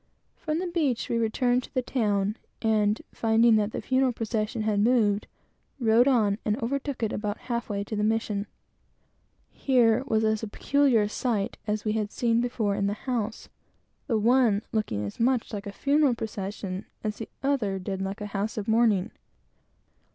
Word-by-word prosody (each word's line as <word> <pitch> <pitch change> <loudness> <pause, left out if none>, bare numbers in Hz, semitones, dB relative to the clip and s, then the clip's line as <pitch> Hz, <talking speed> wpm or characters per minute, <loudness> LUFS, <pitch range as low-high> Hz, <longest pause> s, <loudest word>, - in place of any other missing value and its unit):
From 310 -1 -3
the 365 - -2
beach 310 -9 -1
we 235 - +1
returned 245 +2 +1
to - - -13
the 255 - +1
town, 210 -4 0 0.2
and 215 -1 +2
finding 225 0 +4
that 210 0 0
the - - -5
funeral 260 0 +2
procession 225 -1 -2
had 210 -2 +1
moved, 210 -2 +2 0.5
rode 235 +1 +4
on 215 -6 +3
and 210 0 0
overtook 275 +1 -3
it, 220 - 0
about 210 0 -2
half 235 -2 -4
way 200 -1 -2
to 215 - -5
the 210 - 0
mission. 215 -2 0 1.0
Here 245 -2 +3
was 220 -3 +2
as 220 0 +1
peculiar 275 -5 +3
a - - 0
sight 215 -2 -2
as 210 +1 -1
we 215 - +1
had 215 -1 -1
seen 235 -1 +1
before 235 -4 -1
in 200 0 0
the 205 +1 -4
house; 235 -4 -2 0.6
the 230 -6 +1
one 225 -2 +3
looking 110 - -1
as 100 - -7
much 245 -1 +1
like 205 0 -5
a - - -4
funeral 280 +3 +2
procession 200 -3 -5 0.2
as 215 -1 -2
the 225 - -7
other 245 -9 0
did 190 0 -4
like 195 +2 -4
a - - -3
house 205 +3 -2
of 205 - -3
mourning. 220 -3 +3
220 Hz, 175 wpm, -27 LUFS, 205-245 Hz, 1.0 s, finding